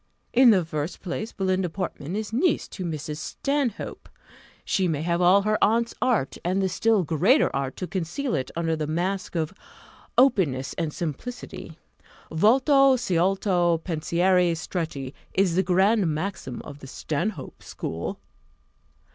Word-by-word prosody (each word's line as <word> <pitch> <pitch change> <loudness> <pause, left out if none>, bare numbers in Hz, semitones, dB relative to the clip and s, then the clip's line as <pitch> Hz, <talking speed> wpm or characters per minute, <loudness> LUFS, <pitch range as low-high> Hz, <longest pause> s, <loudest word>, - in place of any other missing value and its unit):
In 255 0 +7
the 190 -6 +4
first 155 +1 -4
place, 195 +5 -4
Belinda 185 -2 0
Portman 175 -2 -5
is 215 +1 -4
niece 300 +7 +1
to 190 - -6
Mrs. 155 -2 -4
Stanhope; 275 - -3 0.6
she 190 -2 +1
may 155 -3 -1
have 170 +1 0
all 185 +3 +5
her 215 +1 +1
aunt's 230 +2 +2
art, 230 - +1
and 185 +3 0
the 190 -1 +1
still 215 +3 +2
greater 175 - +3
art 135 -1 -2
to 185 - -3
conceal 190 - -3
it 130 -3 -1
under 165 -1 0
the 155 -1 -3
mask 180 +5 -2
of 160 +1 -1 0.6
openness 185 - +3
and 165 -3 -2
simplicity: 185 - -6 0.5
Volto 265 - +5
sciolto, 180 -4 +1
pensieri 175 +2 +2
stretti, 160 -6 -4 0.2
is 190 -2 +3
the 190 - +4
grand 190 +2 +3
maxim 160 -4 -4
of 145 0 -10
the 135 - -10
Stanhope 165 +10 -4
school." - - -5
180 Hz, 140 wpm, -25 LUFS, 160-210 Hz, 0.6 s, In